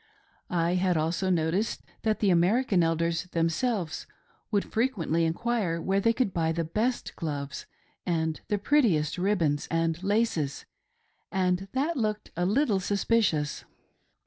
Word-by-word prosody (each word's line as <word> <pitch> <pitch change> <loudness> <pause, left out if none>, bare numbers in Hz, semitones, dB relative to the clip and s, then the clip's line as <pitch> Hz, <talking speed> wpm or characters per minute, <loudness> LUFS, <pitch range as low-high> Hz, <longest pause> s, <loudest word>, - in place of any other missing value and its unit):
I 170 0 +1
had 180 -1 +2
also 165 +4 0
noticed 175 +5 0 0.2
that 215 -1 0
the 200 -3 +4
American 190 +3 +3
Elders 165 +1 0
themselves 170 +2 -1 0.4
would 205 -2 +1
frequently 185 -9 0
enquire 180 0 -1
where 190 +4 +1
they 230 +3 +3
could 230 -5 0
buy 160 -1 +1
the 165 0 -1
best 220 +10 -2
gloves 145 -4 -5 0.4
and 160 -3 -1
the 205 - +1
prettiest 195 - +2
ribbons 170 -7 +1
and 165 0 0
laces, 195 -8 0 0.7
and 185 0 0
that 290 +5 0
looked 215 -3 -2
a 175 +1 0
little 215 -1 +2
suspicious. 195 -6 +1
180 Hz, 130 wpm, -28 LUFS, 165-215 Hz, 0.7 s, the